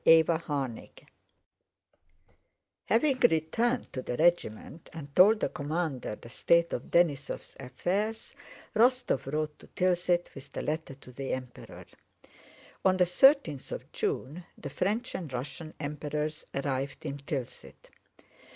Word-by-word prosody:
CHAPTER 165 0 +6
XIX 135 -6 -4 1.8
Having 260 +3 +3
returned 230 +11 0
to 130 - -3
the 125 - -4
regiment 165 -3 0
and 145 -4 -9
told 210 +4 +7
the - - +1
commander 145 -6 -2
the 120 - -13
state 170 +7 +2
of 120 - -3
Denísov's 150 -5 +1
affairs, 195 - -2 0.4
Rostóv 240 - +2
rode 150 0 -2
to - - -15
Tilsit 175 -1 +1
with 135 0 -11
the - - -3
letter 155 -2 -3
to 130 -1 -15
the 135 +2 -4
Emperor. 125 -2 -7 1.0
On 185 -1 +4
the 180 - +5
thirteenth 180 - +4
of - - -6
June 155 +7 -2
the 140 - -7
French 210 - -1
and 165 -7 -5
Russian 145 +5 -6
Emperors 150 +1 -3
arrived 140 +1 -2
in 140 -1 -3
Tilsit. 135 -3 -6
155 Hz, 125 wpm, -30 LUFS, 140-180 Hz, 1.8 s, told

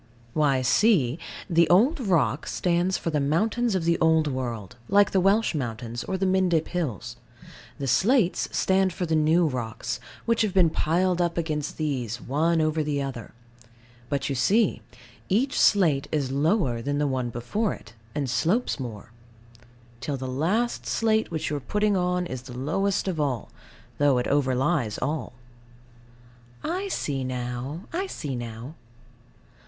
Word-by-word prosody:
Why, 140 -4 +2
see. 155 - +3 0.3
The 170 -3 +3
old 245 - +4
rock 155 - +1
stands 180 +1 +1
for 165 - -3
the 150 - +1
mountains 210 +10 +1
of 185 - 0
the 170 0 +2
Old 160 -1 +4
World, 120 -8 -4
like 200 +1 +4
the 190 - +3
Welsh 200 +4 +3
mountains, 120 -4 -4
or 190 - -2
the 190 - 0
Mendip 185 -4 +2
Hills. 120 - -3 0.6
The 140 - -4
slates 200 - +2
stand 190 -1 +2
for 180 - -2
the 160 -1 0
new 160 +3 +3
rocks, 120 -3 -3 0.3
which 230 -1 +2
have 205 -3 0
been 175 -4 +5
piled 175 +3 +1
up 170 -1 0
against 155 -3 -2
these, 125 -7 -2
one 160 +5 +1
over 155 0 +1
the 145 -1 -1
other. 130 -6 -6 0.7
But, 140 -2 -1
you 140 - -1
see, 195 - +2 0.5
each 245 +8 +1
slate 160 -9 +4
is 140 -4 -1
lower 140 - +1
than 145 +4 -2
the 150 - +1
one 130 -3 -1
before 120 - -2
it, 110 - -16 0.2
and 145 -2 -1
slopes 175 - 0
more; 115 -4 -7 0.9
till 135 +2 -3
the 130 0 -5
last 180 - -1
slate 220 -1 +1
which 160 -2 -3
you 150 - 0
are - - -4
putting 210 +7 0
on 180 -1 0
is 130 -7 -5
the 125 -1 -10
lowest 195 +10 0
of 175 -4 -2
all, 135 -7 -2 0.5
though 145 -3 +4
it 125 - 0
overlies 135 -3 +1
all. 145 -1 -3 1.3
I 370 +5 -2
see 140 - -2
now. 125 +4 -4
I 375 +3 -1
see 140 - -5
now. 120 +3 -7
155 Hz, 160 wpm, -26 LUFS, 130-185 Hz, 1.3 s, been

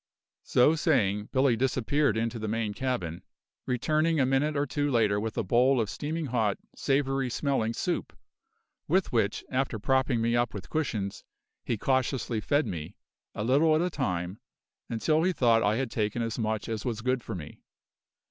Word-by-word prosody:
So 125 +5 +4
saying, 105 - +1
Billy 130 -2 +3
disappeared 130 +1 +1
into 115 +1 -1
the 110 - -3
main 110 -1 -1
cabin, 105 -10 -3 0.5
returning 155 +6 +1
a 130 - +4
minute 140 +3 +1
or 140 - +1
two 145 +1 -1
later 110 -5 +2
with 110 +2 -4
a 115 - +1
bowl 125 +6 +3
of 110 -3 -1
steaming 160 +2 -3
hot, 115 -6 0 0.2
savoury 135 -1 0
smelling 120 -3 0
soup, - - -3 0.7
with 185 +4 +2
which, 110 -4 0
after 130 -3 0
propping 130 +2 +1
me 115 +1 +1
up 120 -2 0
with 95 - -8
cushions, 110 -11 -2 0.4
he 120 - -1
cautiously 130 -2 0
fed 145 +8 +1
me, 85 +3 -6 0.4
a 105 - -2
little 145 +7 +4
at 155 - +2
a 180 - -1
time, 90 - -2 0.5
until 155 +7 +1
he 185 +2 +2
thought 115 -6 +3
I 105 0 +2
had 130 -1 -2
taken 110 +1 -1
as 115 +1 -3
much 110 -1 -1
as 110 -2 -3
was 115 -3 -3
good 125 +1 0
for 110 - -5
me. 75 -4 -9
120 Hz, 175 wpm, -28 LUFS, 110-135 Hz, 0.7 s, So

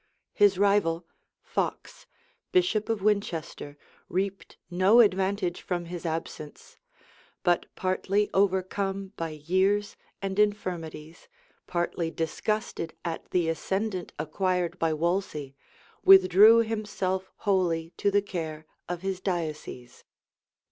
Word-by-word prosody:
His 205 -2 +4
rival, 190 -4 +2 0.4
Fox, - - -4 0.4
bishop 355 - +2
of 220 -4 -1
Winchester 170 -8 -1 0.3
reaped 195 +2 -3
no 190 +6 +5
advantage 190 -3 +2
from 175 -2 -3
his 170 0 -5
absence; 160 -2 -6 0.7
but 175 -1 +2
partly 195 +2 0
overcome 195 0 0
by 165 -1 -3
years 185 +7 0 0.2
and 195 0 -3
infirmities, 175 -6 -2 0.4
partly 175 -1 -1
disgusted 165 +1 -3
at 165 -1 -4
the 175 -2 +1
ascendant 190 +3 -2
acquired 180 +2 -1
by 165 -1 +1
Wolsey, 155 -3 -2 0.5
withdrew 195 +4 +8
himself 205 -4 -2
wholly 175 -5 0
to 200 - +2
the 200 0 +2
care 160 -5 -5 0.2
of 175 0 -4
his 190 -1 -2
diocese. 155 -9 -4
185 Hz, 105 wpm, -27 LUFS, 165-200 Hz, 0.7 s, withdrew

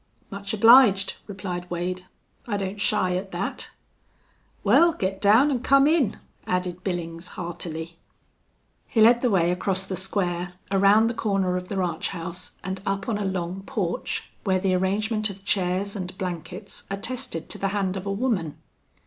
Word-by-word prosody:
"Much 200 0 -4
obliged," 220 -3 +6
replied 180 -3 -5
Wade. 180 +1 -3 0.4
"I 205 -3 -1
don't 200 +1 -4
shy 185 -3 +2
at 190 +2 -3
that." 175 +3 -3 0.9
"Wal, 340 0 +5
git 190 -4 -3
down 225 +8 +5
an' 260 - 0
come 275 +2 +5
in," 295 - +2 0.3
added 180 0 -2
Billings, 170 -2 -4
heartily. 170 -1 -5 0.9
He 225 - -1
led 235 +2 +6
the 250 - +2
way 175 -4 +3
across 190 +1 -1
the 190 - -4
square, 180 -2 -1 0.2
around 200 +3 +5
the 230 - 0
corner 195 -5 0
of 180 0 -4
the 200 - -4
ranch 175 -3 -1
house, 170 -1 -5
and 190 0 -4
up 195 -1 -2
on 215 -3 -1
a 205 - -2
long 185 0 -3
porch, 175 -5 -3
where 190 -3 +2
the 185 0 +1
arrangement 210 +4 0
of 195 0 -10
chairs 190 +1 0
and 185 -1 -5
blankets 180 +2 -5
attested 200 -3 -3
to - - -3
the 195 - 0
hand 195 -2 -1
of 190 +1 -5
a - - 0
woman. 200 - -1
190 Hz, 165 wpm, -25 LUFS, 180-205 Hz, 0.9 s, obliged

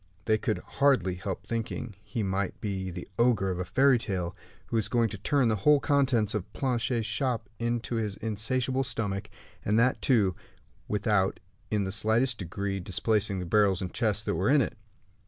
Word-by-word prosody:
They 110 0 +2
could 110 - 0
hardly 135 -10 +2
help 95 +1 -5
thinking 115 +1 -4
he 110 +1 -3
might 95 0 -2
be 95 -3 -3
the 90 0 -7
ogre 115 -6 +3
of 90 - -3
the 90 - -2
fairy 130 +7 +4
tale, 90 -6 -2 0.3
who - - -4
was 110 -2 +1
going 115 -1 +2
to 100 - -6
turn 135 +3 +2
the 110 - +2
whole 145 +8 +5
contents 130 -8 +2
of 105 -4 -3
Planchet's 125 -3 0
shop 115 +1 -1
into 120 0 -1
his 105 -3 -2
insatiable 125 +4 0
stomach, 105 -5 -2 0.3
and 105 +2 +1
that, 125 +3 +3
too, 105 -9 +3 0.5
without 105 -2 +1 0.3
in 105 -2 +1
the 95 - -3
slightest 110 +4 +1
degree 100 +2 -3
displacing 100 +2 +1
the 90 - -3
barrels 100 0 +3
and 90 - -4
chests 110 -3 0
that - - -1
were - - +1
in 145 0 +5
it. - - -2
110 Hz, 180 wpm, -28 LUFS, 95-120 Hz, 0.5 s, whole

